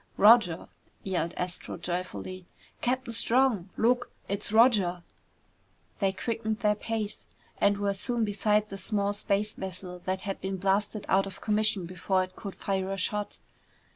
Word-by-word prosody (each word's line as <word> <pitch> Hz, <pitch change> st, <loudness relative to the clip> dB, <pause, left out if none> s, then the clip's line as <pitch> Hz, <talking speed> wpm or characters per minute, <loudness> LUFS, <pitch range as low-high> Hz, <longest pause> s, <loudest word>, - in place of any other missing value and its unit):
"Roger!" 210 Hz, -6 st, +6 dB, 0.4 s
yelled 175 Hz, -3 st, -1 dB
Astro 180 Hz, 0 st, -4 dB
joyfully. 180 Hz, +1 st, -5 dB, 0.3 s
"Captain 250 Hz, -1 st, 0 dB
Strong, 230 Hz, -5 st, +2 dB
look! 245 Hz, +2 st, +2 dB, 0.2 s
It's 200 Hz, +1 st, -2 dB
Roger!" 210 Hz, -7 st, +4 dB, 1.0 s
They 195 Hz, -2 st, +2 dB
quickened 220 Hz, +2 st, -3 dB
their 210 Hz, -2 st, +4 dB
pace 215 Hz, 0 st, -4 dB, 0.3 s
and 200 Hz, 0 st, +4 dB
were 200 Hz, 0 st, 0 dB
soon 235 Hz, +3 st, 0 dB
beside 210 Hz, +1 st, +1 dB
the 195 Hz, -, -6 dB
small 200 Hz, 0 st, 0 dB
space 205 Hz, +1 st, 0 dB
vessel 185 Hz, -1 st, -6 dB
that 190 Hz, 0 st, -1 dB
had 195 Hz, -1 st, -4 dB
been 190 Hz, 0 st, -2 dB
blasted 200 Hz, +2 st, 0 dB
out 195 Hz, +1 st, +3 dB
of 195 Hz, -, -9 dB
commission 215 Hz, -3 st, +2 dB
before 185 Hz, +1 st, 0 dB
it 185 Hz, 0 st, -9 dB
could 200 Hz, -3 st, -7 dB
fire 190 Hz, -1 st, -2 dB
a 195 Hz, -, -2 dB
shot. 205 Hz, +2 st, -2 dB
200 Hz, 145 wpm, -29 LUFS, 185-215 Hz, 1.0 s, Roger